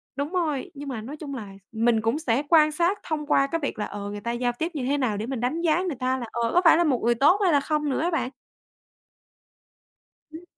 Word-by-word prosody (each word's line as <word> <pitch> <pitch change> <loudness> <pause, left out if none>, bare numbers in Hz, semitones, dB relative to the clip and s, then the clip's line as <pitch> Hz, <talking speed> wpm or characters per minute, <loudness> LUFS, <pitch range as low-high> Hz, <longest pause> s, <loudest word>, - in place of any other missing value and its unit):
Đúng 285 +3 -3
rồi! 320 -7 -1
Nhưng 285 -1 -7
mà 240 -5 -4
nói 270 +8 -8
chung 285 -2 -6
là 215 -6 -7 0.2
mình 225 0 +2
cũng 225 +7 0
sẽ 265 -3 0
quan 310 -2 +6
sát 345 +6 +1
thông 305 -2 -3
qua 275 -2 +3
cái 330 +4 -2
việc 275 - -3
là, 210 - -1
ờ, 205 0 -6
người 205 0 -6
ta 235 - -3
giao 245 +1 0
tiếp 330 +2 -1
như 265 -4 -2
thế 280 +3 +1
nào 245 -7 0
để 210 - -3
mình 260 0 -4
đánh 255 +8 -1
giá 340 +1 +2
người 360 -5 -2
ta 255 +1 0
là, 240 - -4
ờ, 235 -1 -1
có 355 - +5
phải 330 - +7
là 345 - +3
một 275 -7 +1
người 240 0 +3
tốt 295 - +4
hay 365 - +4
là 290 - +4
không 300 +1 -1
nữa 265 - -1
á 345 +2 0
bạn. 315 -6 -1 2.0
Ưm, 320 +2 -10
280 Hz, 260 wpm, -25 LUFS, 240-320 Hz, 2.0 s, phải